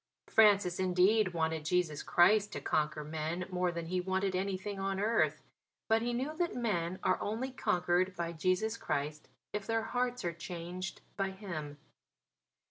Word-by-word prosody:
Francis, 200 -5 +4
indeed, 185 +2 +3
wanted 160 -1 0
Jesus 160 -2 0
Christ 205 +4 +4
to - - -3
conquer 150 0 0
men 160 +4 -3
more 180 -1 +1
than 170 -1 -4
he 180 +2 -1
wanted 190 +1 0
anything 195 +1 -2
on 195 0 -1
earth; 155 -8 +1 0.4
but 225 0 +3
he 240 +1 -1
knew 265 +6 -2
that 345 -1 0
men 185 -7 -1
are 185 - +2
only 230 +6 -2
conquered 180 -4 +1
by 170 -1 -3
Jesus 185 +7 0
Christ 150 +2 -3 0.3
if 210 -1 -3
their 225 -1 +1
hearts 245 -1 -1
are 170 - -1
changed 175 +2 -6 0.2
by 195 -1 0
Him. 170 -7 -6
185 Hz, 155 wpm, -33 LUFS, 170-210 Hz, 0.4 s, Francis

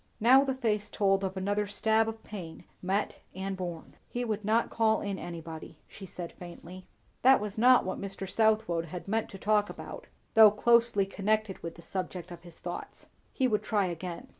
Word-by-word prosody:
Now 255 +5 +6
the 265 -2 -1
face 215 -5 -1
told 195 -1 +2
of 190 0 -3
another 205 +2 0
stab 220 +2 +2
of 225 0 -8
pain, 175 -6 -8 0.2
met 195 +3 -1 0.2
and 190 +1 -3
borne. 175 -3 -7
"He 245 0 -3
would 215 -2 -2
not 220 +3 +1
call 220 -1 +2
in 200 -2 -3
anybody," 165 -2 -8
she 195 - -11
said 175 -1 -7
faintly. 180 +1 -11 0.3
That 265 +1 +6
was 210 -1 -5
not 245 +2 +5
what 185 - -4
Mr. 195 -1 -5
Southwode 215 -5 +2
had 170 +1 -8
meant 220 +2 -1
to 195 - -9
talk 210 +1 +2
about, - - -9 0.3
though 220 -2 +9
closely 230 -1 +3
connected 210 +1 -1
with 170 - -6
the 170 - -13
subject 180 0 -5
of 175 -1 -9
his 175 -1 -14
thoughts. 175 0 -7 0.3
He 260 - +1
would 210 -4 +1
try 210 -2 +1
again. 175 0 -6
200 Hz, 190 wpm, -30 LUFS, 180-220 Hz, 0.3 s, though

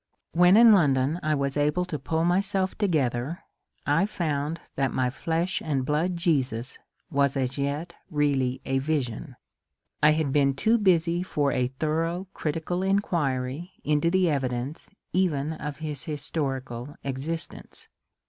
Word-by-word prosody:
When 180 +3 +6
in 230 -1 +8
London 145 -3 +3
I 155 -2 +1
was 140 -1 -1
able 150 +5 +1
to 160 -5 -4
pull 160 +4 0
myself 190 +1 +1
together, 150 - 0 0.4
I 165 +7 +3
found 160 -5 -2 0.2
that 135 -1 0
my 125 -1 0
flesh 165 +6 -1
and 140 -4 -1
blood 165 +5 0
Jesus 135 - 0 0.3
was 140 -1 +2
as 130 0 -1
yet 145 +5 -2 0.2
really 140 -5 0
a 135 0 +1
vision* 135 -3 -2 0.7
I 150 0 +6
had 155 -3 0
been 140 -1 +3
too 225 +11 +2
busy 175 -3 +3
for 145 -6 0
a 125 -1 +1
thorough 160 +7 -2
critical 165 +3 -2
inquiry 170 -6 -1
into 150 +2 +2
the 185 0 +3
evidence 135 0 -2 0.2
even 160 -5 +1
of 150 -2 -6
his 150 -3 -4
historical 135 -4 -3
existence. 140 +5 -5
150 Hz, 140 wpm, -26 LUFS, 135-170 Hz, 0.7 s, in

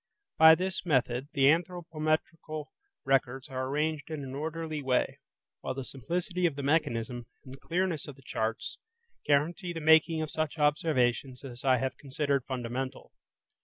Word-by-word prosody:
By 160 0 +10
this 185 +1 -2
method 130 -5 +1
the 140 - +1
anthropometrical 155 -1 0 0.4
records 135 0 +1
are 130 -1 -3
arranged 150 +2 -1
in 155 -3 -4
an 130 -1 -7
orderly 155 +1 -3
way, 130 -2 0 0.4
while - - -4
the 135 -1 -5
simplicity 175 - -1
of 155 - -3
the 140 - -4
mechanism, 125 -6 0 0.2
and 130 - -10
the 135 - -11
clearness 175 -3 -1
of 145 - -8
the 135 - -19
charts, 110 -1 -3 0.5
guarantee 165 +5 +1
the 165 - -4
making 160 +1 +5
of 155 - -5
such 155 0 -2
observations 140 -4 +1
as 125 -3 -9
I 130 -2 +4
have 130 +2 -2
considered 140 -1 -1
fundamental. 130 +1 -4
145 Hz, 155 wpm, -30 LUFS, 130-160 Hz, 0.5 s, By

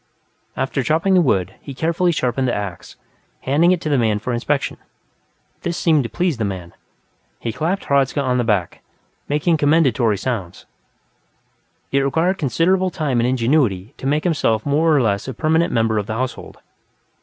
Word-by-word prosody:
After 135 +1 -1
chopping 160 +8 +1
the 185 - +5
wood, 100 - +1
he 140 - -9
carefully 170 +4 +1
sharpened 130 -3 0
the 120 - 0
ax, 100 -4 -6 0.5
handing 155 +7 +3
it 180 - +2
to - - -4
the 140 -3 +2
man 110 -3 +2
for 120 +4 -4
inspection. 135 +4 -1 0.8
This 170 0 -3
seemed 160 -4 +3
to 115 - -4
please 175 -6 -1
the 115 - -2
man; 95 -4 -5 0.6
he 115 - -4
clapped 175 - -2
Hradzka 140 0 +1
on 125 -2 +1
the - - +2
shoulder, 105 -6 -1 0.5
making 150 +3 +2
commendatory 135 -8 +2
sounds. 100 -7 -4 1.3
It 140 - +3
required 165 +8 +1
considerable 175 +7 +1
time 150 -9 -1
and 120 - +2
ingenuity 125 -4 +1
to 135 - -5
make 150 +2 +1
himself 130 -10 +1
a - - -2
more 160 +3 +3
or 145 -4 +3
less 100 +2 -1
permanent 160 +2 +2
member 115 -2 +1
of 105 - -5
the 110 - -3
household. 130 +2 -5
135 Hz, 170 wpm, -20 LUFS, 115-160 Hz, 1.3 s, the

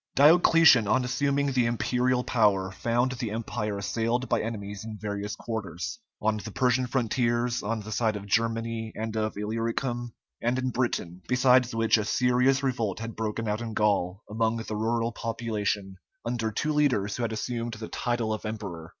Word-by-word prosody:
Diocletian, 155 - +6
on 115 +5 +2
assuming 140 +2 +1
the 125 -3 +2
imperial 125 +2 +1
power, 100 -6 +2
found 120 +5 0
the 120 -3 -3
Empire 105 -1 -3
assailed 115 +5 -1
by - - +1
enemies 105 -2 -5
in 110 -1 -7
various 105 0 -4
quarters 105 - -5 0.2
on 110 0 +1
the 110 +1 -6
Persian 125 +3 +1
frontiers, 120 -1 0
on 110 +1 -2
the 105 +1 -8
side 110 0 +1
of 100 -1 -6
Germany 115 +1 0
and 110 0 -4
of 110 -1 -1
Illyricum, 115 +3 -2 0.3
and 120 +2 +1
in 130 0 -1
Britain; 95 -8 -2
besides 125 -1 +4
which 115 0 +3
a - - 0
serious 125 +4 +2
revolt 115 -7 -1
had 115 0 -6
broken 110 +1 -2
out 105 +2 -1
in 115 -2 -5
Gaul 100 -2 +1
among 110 +1 0
the 110 -1 -4
rural 115 +2 0
population, 105 -4 -2 0.3
under 115 -2 -1
two 150 +8 -1
leaders 125 -9 +1
who - - -3
had 115 -1 -1
assumed 115 +1 -3
the 110 0 -7
title 120 -3 -1
of 110 - -5
emperor. 100 -7 -5
115 Hz, 170 wpm, -27 LUFS, 105-125 Hz, 0.3 s, Diocletian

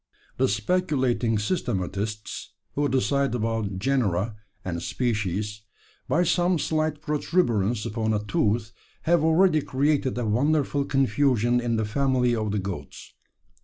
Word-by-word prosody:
"The 130 - +3
speculating 125 - +1
systematists 105 - -3 0.3
who 145 0 0
decide 135 0 +1
about 110 -4 -2
genera 110 -4 0 0.3
and 85 -2 -3
species, 105 -2 -2 0.5
by 175 - +2
some 175 +1 +2
slight 155 -1 -1
protuberance 120 - +1
upon 110 -1 -1
a 105 -1 0
tooth 110 +2 0 0.3
have 170 -1 +3
already 160 0 +4
created 140 -1 0
a 120 - -1
wonderful 140 +5 +1
confusion 125 -2 +2
in 120 -1 0
the 110 -1 0
family 125 +1 +1
of 110 -2 -1
the 105 - -1
goats. 95 -8 -6
120 Hz, 125 wpm, -25 LUFS, 105-145 Hz, 0.5 s, already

